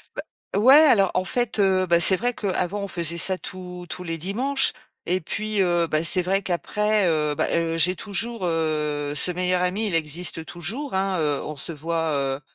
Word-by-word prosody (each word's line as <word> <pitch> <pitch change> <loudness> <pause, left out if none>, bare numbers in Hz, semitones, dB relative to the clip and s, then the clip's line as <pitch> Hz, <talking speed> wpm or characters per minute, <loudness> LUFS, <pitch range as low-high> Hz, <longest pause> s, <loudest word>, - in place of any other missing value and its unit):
Bah, - - -4 0.4
ouais, 260 +5 +7
alors 235 - +5
en 185 - 0
fait, 240 +3 -2
heu, 190 -2 +2
bah, 170 0 +3
c'est 190 +1 +6
vrai 245 +3 -2
qu'avant, 195 0 -2
on 200 - -4
faisait 170 -1 -2
ça 185 +1 +1
tous 180 -1 -9
tous 180 - -6
les 165 -1 -4
dimanches. 255 - 0 0.3
Et 185 +2 0
puis, 215 +4 -3
heu, 175 -2 +2
bah, 155 0 -1
c'est 180 +1 +5
vrai 195 +2 0
qu'après, 210 +3 0
heu, 150 -2 0
bah, - - -1
heu, 165 0 0
j'ai 180 +3 +3
toujours, 225 0 -3
heu, 150 -3 -1
ce 180 - +4
meilleur 180 0 0
ami, 195 +5 0
il 175 - -2
existe 160 +1 -1
toujours, 210 - -5
hein, 190 -1 0
heu, 145 -2 -1
on 150 - -6
se 165 +4 -1
voit, 160 +1 -2
heu 135 0 -2
180 Hz, 200 wpm, -23 LUFS, 165-200 Hz, 0.4 s, ouais